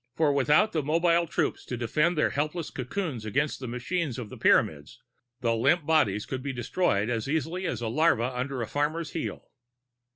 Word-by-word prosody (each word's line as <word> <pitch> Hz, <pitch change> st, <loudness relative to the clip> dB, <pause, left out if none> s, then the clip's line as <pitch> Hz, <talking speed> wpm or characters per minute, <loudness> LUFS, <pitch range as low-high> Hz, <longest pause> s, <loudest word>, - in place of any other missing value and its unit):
For 155 Hz, -3 st, +3 dB
without 150 Hz, +10 st, +3 dB
the 160 Hz, -, 0 dB
mobile 170 Hz, +3 st, +2 dB
troops -, -, -1 dB
to 125 Hz, -, -4 dB
defend 150 Hz, +8 st, +1 dB
their 150 Hz, -, +2 dB
helpless 155 Hz, +3 st, -2 dB
cocoons 135 Hz, -, -4 dB
against 140 Hz, +8 st, -1 dB
the 130 Hz, -, -6 dB
machines 125 Hz, +4 st, -2 dB
of 120 Hz, -5 st, -6 dB
the -, -, -9 dB
Pyramids, 75 Hz, -2 st, +2 dB, 0.4 s
the 115 Hz, -2 st, +1 dB
limp 145 Hz, +8 st, +2 dB
bodies 110 Hz, -11 st, +2 dB
could 130 Hz, -1 st, -4 dB
be 140 Hz, 0 st, -4 dB
destroyed 120 Hz, -, 0 dB
as 115 Hz, +1 st, -2 dB
easily 160 Hz, +5 st, -1 dB
as 120 Hz, -7 st, -3 dB
a 115 Hz, -, -2 dB
larva 125 Hz, -2 st, +2 dB
under 130 Hz, 0 st, -2 dB
a -, -, -5 dB
farmer's 150 Hz, +5 st, -1 dB
heel. 165 Hz, -, -5 dB
140 Hz, 185 wpm, -27 LUFS, 120-160 Hz, 0.4 s, For